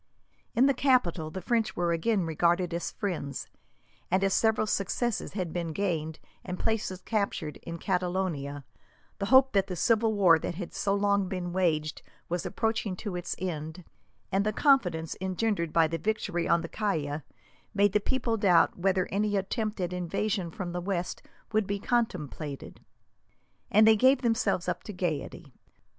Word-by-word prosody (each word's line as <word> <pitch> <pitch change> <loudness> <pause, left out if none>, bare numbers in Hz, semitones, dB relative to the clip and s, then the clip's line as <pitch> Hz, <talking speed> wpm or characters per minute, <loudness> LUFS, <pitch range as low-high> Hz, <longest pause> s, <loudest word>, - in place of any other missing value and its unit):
In 250 - +5
the 275 - +4
capital 245 - +2
the 185 +3 -7
French 225 -1 0
were 175 -1 0
again 185 +3 +1
regarded 170 +2 +1
as 170 - -2
friends, 165 - -4 0.6
and 185 +2 +2
as 195 -1 +2
several 220 -1 +3
successes 215 +3 -1
had 180 -5 -3
been 170 -2 -3
gained 160 -5 -2 0.3
and 180 -1 -5
places 205 -4 -2
captured, 200 -8 -2
in 170 0 -7
Catalonia, 175 -7 -2 0.5
the 200 - -1
hope 265 +2 +6
that 195 -1 +2
the 185 - -4
civil 225 +4 +2
war 180 -6 +5
that 170 - -4
had 180 -1 -6
so 200 0 0
long 200 -1 +2
been 180 -2 -4
waged 160 -4 0 0.3
was 175 0 -2
approaching 220 -4 -1 0.2
its 175 0 -3
end, 165 -1 -5 0.5
and 195 +1 +2
the 215 - +1
confidence 185 - +2
engendered 190 -2 -1
by 165 0 +4
the 165 +1 -3
victory 175 -3 -1
on 170 0 +3
the 165 - -5
Caya, 160 -8 -2 0.5
made 200 -1 +4
the 210 - +4
people 235 0 -1
doubt 180 -5 +4
whether 185 0 +1
any 205 +1 +1
attempt 215 +2 -2
at 180 -1 -2
invasion 185 +1 -1
from 175 +2 -5
the 175 0 -3
west 180 -1 -3 0.3
would 215 -2 +1
be 200 - -1
contemplated, 160 - -3 0.9
and 215 +2 +6
they 220 - +7
gave 260 +4 +4
themselves 225 -6 +1
up 180 0 -1
to 210 - -8
gaiety. 160 -5 -4
185 Hz, 160 wpm, -29 LUFS, 170-215 Hz, 0.9 s, they